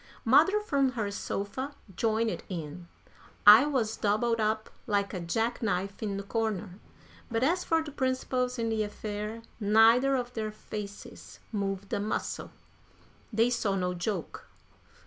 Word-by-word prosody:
Mother 305 Hz, -, +5 dB
from 275 Hz, -9 st, +1 dB
her 215 Hz, -4 st, -2 dB
sofa 205 Hz, +8 st, -4 dB, 0.2 s
joined 225 Hz, +2 st, 0 dB
in. 170 Hz, -1 st, -6 dB, 0.6 s
I 215 Hz, +7 st, +10 dB
was 235 Hz, -7 st, 0 dB
doubled 225 Hz, +2 st, +1 dB
up 215 Hz, 0 st, 0 dB, 0.2 s
like 200 Hz, -2 st, 0 dB
a 185 Hz, -, -3 dB
jack 225 Hz, +8 st, -1 dB
knife 200 Hz, -2 st, -2 dB
in 205 Hz, -3 st, -2 dB
the 200 Hz, -, -4 dB
corner. 210 Hz, -3 st, -2 dB, 0.5 s
But 230 Hz, 0 st, 0 dB
as 345 Hz, +6 st, +2 dB
for 325 Hz, -1 st, +1 dB
the 305 Hz, -, -8 dB
principals 255 Hz, -2 st, -1 dB
in 230 Hz, -1 st, -1 dB
the 220 Hz, -1 st, 0 dB
affair, 210 Hz, +1 st, -4 dB, 0.2 s
neither 225 Hz, +6 st, +5 dB
of 250 Hz, -1 st, -3 dB
their 215 Hz, -2 st, -3 dB
faces 210 Hz, -1 st, -8 dB
moved 200 Hz, -2 st, -3 dB
a -, -, +1 dB
muscle. 210 Hz, +2 st, -3 dB, 0.8 s
They 230 Hz, +2 st, +3 dB
saw 215 Hz, -5 st, 0 dB
no 180 Hz, -1 st, -1 dB
joke. 180 Hz, 0 st, -4 dB
220 Hz, 145 wpm, -29 LUFS, 200-245 Hz, 0.8 s, I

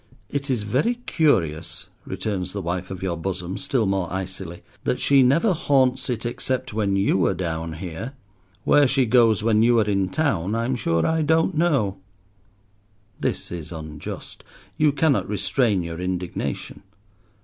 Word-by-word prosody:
"It 140 Hz, 0 st, -2 dB
is 120 Hz, -5 st, 0 dB
very 135 Hz, -, +1 dB
curious," 85 Hz, -, +1 dB, 0.2 s
returns 95 Hz, -4 st, -3 dB
the 100 Hz, -, -3 dB
wife 90 Hz, +1 st, -3 dB
of 95 Hz, 0 st, -6 dB
your 90 Hz, -3 st, -1 dB
bosom, 90 Hz, +1 st, -4 dB
still 135 Hz, -5 st, +1 dB
more 95 Hz, -3 st, -1 dB
icily, 95 Hz, -2 st, -5 dB, 0.2 s
"that 125 Hz, -, 0 dB
she 140 Hz, -1 st, +5 dB
never 160 Hz, -, +4 dB
haunts 130 Hz, -5 st, +2 dB
it 120 Hz, -2 st, -2 dB
except 130 Hz, +1 st, -2 dB
when 105 Hz, -2 st, +1 dB
you 95 Hz, -1 st, +2 dB
are -, -, 0 dB
down 80 Hz, -2 st, -3 dB
here. 85 Hz, -, -6 dB, 0.5 s
Where 145 Hz, -1 st, +5 dB
she 135 Hz, 0 st, +2 dB
goes 115 Hz, -3 st, +4 dB
when 110 Hz, -1 st, +3 dB
you 120 Hz, 0 st, +5 dB
are 110 Hz, -, +3 dB
in 100 Hz, -2 st, +1 dB
town 115 Hz, -, 0 dB
I'm 120 Hz, +3 st, 0 dB
sure 85 Hz, -8 st, +1 dB
I 160 Hz, 0 st, +1 dB
don't 160 Hz, +1 st, +2 dB
know." 135 Hz, -, +2 dB, 1.2 s
This -, -, -2 dB
is 85 Hz, -1 st, -6 dB
unjust. 80 Hz, -2 st, -7 dB, 0.3 s
You 150 Hz, -1 st, +3 dB
cannot 145 Hz, -1 st, +1 dB
restrain 105 Hz, 0 st, +1 dB
your 85 Hz, 0 st, -6 dB
indignation. 90 Hz, -7 st, -3 dB
105 Hz, 155 wpm, -23 LUFS, 90-130 Hz, 1.2 s, she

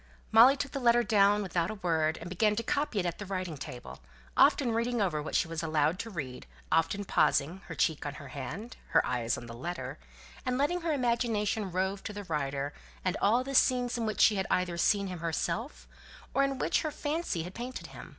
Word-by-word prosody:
Molly 245 Hz, +5 st, +8 dB
took 280 Hz, -1 st, -3 dB
the 275 Hz, -, -3 dB
letter 240 Hz, -1 st, +4 dB
down 205 Hz, -1 st, +4 dB
without 175 Hz, -2 st, -1 dB
a 215 Hz, -, -4 dB
word, 160 Hz, -5 st, 0 dB
and 170 Hz, -, -8 dB
began 210 Hz, +4 st, +2 dB
to 230 Hz, -, -2 dB
copy 280 Hz, -1 st, -1 dB
it 180 Hz, -, -1 dB
at 170 Hz, -1 st, -3 dB
the 205 Hz, -, -5 dB
writing 185 Hz, -4 st, -3 dB
table; 130 Hz, -4 st, -8 dB, 0.4 s
often 255 Hz, -5 st, +5 dB
reading 235 Hz, +1 st, 0 dB
over 175 Hz, -7 st, 0 dB
what 150 Hz, -, -5 dB
she -, -, +2 dB
was 165 Hz, -1 st, -4 dB
allowed 155 Hz, +1 st, +1 dB
to 225 Hz, -, -4 dB
read; 140 Hz, -, -6 dB, 0.2 s
often 165 Hz, +5 st, +1 dB
pausing, 170 Hz, +1 st, +2 dB
her -, -, -6 dB
cheek 160 Hz, -3 st, +1 dB
on 145 Hz, -1 st, -5 dB
her 140 Hz, 0 st, -10 dB
hand, 165 Hz, -, -6 dB, 0.2 s
her -, -, +5 dB
eyes 120 Hz, -1 st, -1 dB
on 120 Hz, -, -8 dB
the 115 Hz, -, -8 dB
letter, 170 Hz, +10 st, -5 dB, 0.4 s
and 255 Hz, -1 st, -1 dB
letting 350 Hz, +6 st, +1 dB
her 335 Hz, -1 st, -1 dB
imagination 230 Hz, -6 st, 0 dB
rove 190 Hz, +2 st, -1 dB
to 210 Hz, -, -5 dB
the 205 Hz, 0 st, -6 dB
writer, 145 Hz, -4 st, -2 dB, 0.3 s
and 185 Hz, -, +1 dB
all 235 Hz, +5 st, +3 dB
the 275 Hz, +1 st, -5 dB
scenes 250 Hz, -2 st, +3 dB
in 230 Hz, -2 st, -1 dB
which 215 Hz, -, -1 dB
she 210 Hz, -, +6 dB
had 190 Hz, -, -1 dB
either 180 Hz, -1 st, +1 dB
seen 200 Hz, +3 st, +2 dB
him 180 Hz, -3 st, -5 dB
herself, 160 Hz, -, -3 dB, 0.5 s
or 275 Hz, -, +3 dB
in 275 Hz, -1 st, 0 dB
which -, -, +1 dB
her 310 Hz, -, -1 dB
fancy 300 Hz, -, -2 dB
had 180 Hz, +2 st, -8 dB
painted 250 Hz, +4 st, -6 dB
him. -, -, -10 dB
195 Hz, 220 wpm, -30 LUFS, 160-235 Hz, 0.5 s, Molly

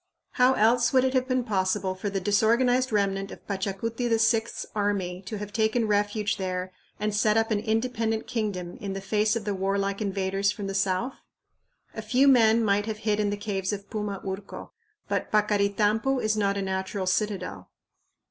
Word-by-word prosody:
How 255 Hz, +1 st, +4 dB
else 240 Hz, +1 st, +3 dB
would 260 Hz, -2 st, +4 dB
it 260 Hz, 0 st, +1 dB
have 255 Hz, -1 st, +1 dB
been 255 Hz, -1 st, +1 dB
possible 190 Hz, -2 st, 0 dB
for 185 Hz, +2 st, -4 dB
the 195 Hz, 0 st, -2 dB
disorganized 235 Hz, +6 st, +2 dB
remnant 195 Hz, -2 st, 0 dB
of -, -, -11 dB
Pachacuti 205 Hz, +5 st, -2 dB
VI's 225 Hz, 0 st, +1 dB
army 200 Hz, -4 st, -1 dB
to 215 Hz, -, -4 dB
have 205 Hz, 0 st, -7 dB
taken 220 Hz, +1 st, +1 dB
refuge 205 Hz, 0 st, 0 dB
there 185 Hz, -1 st, -3 dB, 0.3 s
and 210 Hz, 0 st, -1 dB
set 215 Hz, +1 st, +3 dB
up 225 Hz, 0 st, +1 dB
an 210 Hz, -, +2 dB
independent 225 Hz, 0 st, -1 dB
kingdom 205 Hz, -7 st, -3 dB
in 195 Hz, -1 st, -5 dB
the 195 Hz, -, -4 dB
face 210 Hz, +2 st, +1 dB
of 225 Hz, -3 st, -3 dB
the 205 Hz, -, -1 dB
warlike 195 Hz, +1 st, -1 dB
invaders 195 Hz, 0 st, 0 dB
from 205 Hz, -1 st, -6 dB
the 195 Hz, -, -3 dB
south? 195 Hz, +6 st, 0 dB, 0.8 s
A 220 Hz, -, -5 dB
few 250 Hz, +6 st, +3 dB
men 230 Hz, -3 st, +5 dB
might 205 Hz, +1 st, +1 dB
have 220 Hz, -1 st, -3 dB
hid 210 Hz, -1 st, 0 dB
in 210 Hz, -1 st, +1 dB
the 205 Hz, -, -2 dB
caves 200 Hz, -2 st, -2 dB
of 200 Hz, -1 st, -6 dB
Puma 210 Hz, -3 st, -3 dB
Urco, 195 Hz, +1 st, -6 dB, 0.4 s
but -, -, -2 dB
Paccaritampu 210 Hz, +4 st, +2 dB
is 215 Hz, -2 st, +1 dB
not 200 Hz, -2 st, +1 dB
a 200 Hz, -, -1 dB
natural 190 Hz, 0 st, -3 dB
citadel. 195 Hz, -1 st, -2 dB
210 Hz, 180 wpm, -26 LUFS, 195-225 Hz, 0.8 s, men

